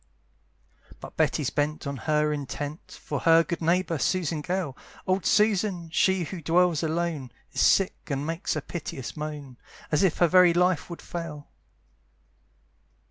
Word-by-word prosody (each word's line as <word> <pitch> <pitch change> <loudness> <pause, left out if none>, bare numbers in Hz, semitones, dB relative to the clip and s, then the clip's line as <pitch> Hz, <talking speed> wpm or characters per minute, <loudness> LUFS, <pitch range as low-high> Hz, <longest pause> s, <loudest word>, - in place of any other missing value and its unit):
But - - -10
Betty's - - +1
bent 150 +1 -1
on 140 0 -3
her 150 +3 +1
intent, 145 +2 -6
For - - -3
her 165 0 +5
good 170 +1 -4
neighbour, 170 -1 +1
Susan 165 -1 0
Gale, 180 -5 -2 0.3
Old 185 -1 0
Susan, 200 -5 +2
she 190 +2 +2
who 170 +1 -6
dwells 170 0 +2
alone, 160 -5 -2 0.2
Is - - 0
sick, 195 -3 +2
and 140 0 -2
makes 165 +3 -2
a - - -3
piteous 150 -6 -6
moan, 150 -4 -6 0.3
As 150 - +2
if 190 -5 +2
her 175 - +4
very 180 0 +6
life 180 -1 +2
would 170 - -8
fail. 160 -4 -7
165 Hz, 145 wpm, -26 LUFS, 150-180 Hz, 0.3 s, very